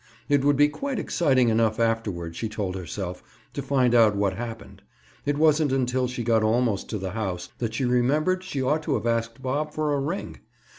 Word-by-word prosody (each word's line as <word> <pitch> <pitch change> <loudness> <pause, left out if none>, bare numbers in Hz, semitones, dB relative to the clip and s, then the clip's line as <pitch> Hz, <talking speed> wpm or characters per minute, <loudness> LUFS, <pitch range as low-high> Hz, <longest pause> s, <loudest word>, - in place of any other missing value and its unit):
It 145 -2 +3
would 145 0 +4
be 145 +1 +6
quite 265 - -4
exciting 130 -12 +2
enough 110 0 +2
afterward, 105 -8 -1
she 110 - -3
told 100 -4 -3
herself, 90 0 -5 0.3
to - - -3
find 130 -3 +2
out 110 -3 +5
what 100 -1 +1
happened. 110 -2 -7 0.5
It 145 0 +1
wasn't 155 -1 +3
until 130 -1 +1
she 125 -1 -4
got 115 -1 +3
almost 110 -1 +1
to 110 - -2
the 95 -1 -4
house, 95 -5 -4
that 115 -2 -2
she 130 - 0
remembered 150 +10 +2
she 145 -8 -3
ought 150 +4 +1
to 150 -3 -1
have - - -3
asked 115 +2 -1
Bob 150 +4 -2
for 155 -1 0
a 140 - +1
ring. 160 +8 -4
120 Hz, 200 wpm, -25 LUFS, 110-145 Hz, 0.5 s, be